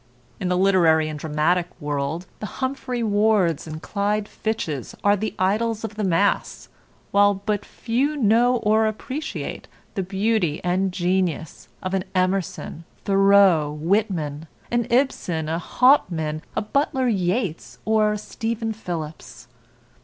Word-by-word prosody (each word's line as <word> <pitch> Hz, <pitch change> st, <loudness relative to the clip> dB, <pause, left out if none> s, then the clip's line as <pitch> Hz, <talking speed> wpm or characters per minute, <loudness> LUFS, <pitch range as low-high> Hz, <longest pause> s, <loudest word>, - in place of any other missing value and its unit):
In 185 Hz, -, -2 dB
the 180 Hz, -, +1 dB
literary 170 Hz, -5 st, +4 dB
and 150 Hz, -1 st, -6 dB
dramatic 160 Hz, +4 st, +1 dB
world, 145 Hz, +3 st, -2 dB
the 210 Hz, -, -4 dB
Humphrey 260 Hz, -2 st, -2 dB
Wards 205 Hz, -7 st, +2 dB
and 155 Hz, +1 st, -7 dB
Clyde 205 Hz, 0 st, -1 dB
Fitches 160 Hz, -, -4 dB
are 205 Hz, 0 st, +5 dB
the 215 Hz, +2 st, -3 dB
idols 215 Hz, +4 st, 0 dB
of 220 Hz, -1 st, -4 dB
the 210 Hz, 0 st, -3 dB
mass, 190 Hz, +2 st, 0 dB, 0.4 s
while 205 Hz, 0 st, +5 dB
but 205 Hz, +1 st, -2 dB
few 265 Hz, +6 st, -1 dB
know 240 Hz, +1 st, +4 dB
or 220 Hz, 0 st, +2 dB
appreciate 275 Hz, +8 st, -5 dB, 0.3 s
the 195 Hz, -, -1 dB
beauty 195 Hz, -3 st, 0 dB
and 185 Hz, +2 st, +1 dB
genius 180 Hz, -3 st, -1 dB
of 185 Hz, 0 st, -3 dB
an 190 Hz, -1 st, 0 dB
Emerson, 185 Hz, -3 st, -1 dB, 0.2 s
Thoreau, 195 Hz, -6 st, +5 dB
Whitman; 165 Hz, -4 st, -1 dB, 0.2 s
an 240 Hz, -1 st, +1 dB
Ibsen, 210 Hz, -, 0 dB
a 165 Hz, +1 st, -1 dB
Hauptmann, 170 Hz, -, +2 dB
a -, -, 0 dB
Butler 265 Hz, +3 st, 0 dB
Yeats, 190 Hz, -3 st, -1 dB
or 215 Hz, -1 st, +3 dB
a -, -, -2 dB
Stephen 225 Hz, +1 st, -3 dB
Phillips. 160 Hz, -, -7 dB
195 Hz, 130 wpm, -23 LUFS, 170-220 Hz, 0.4 s, are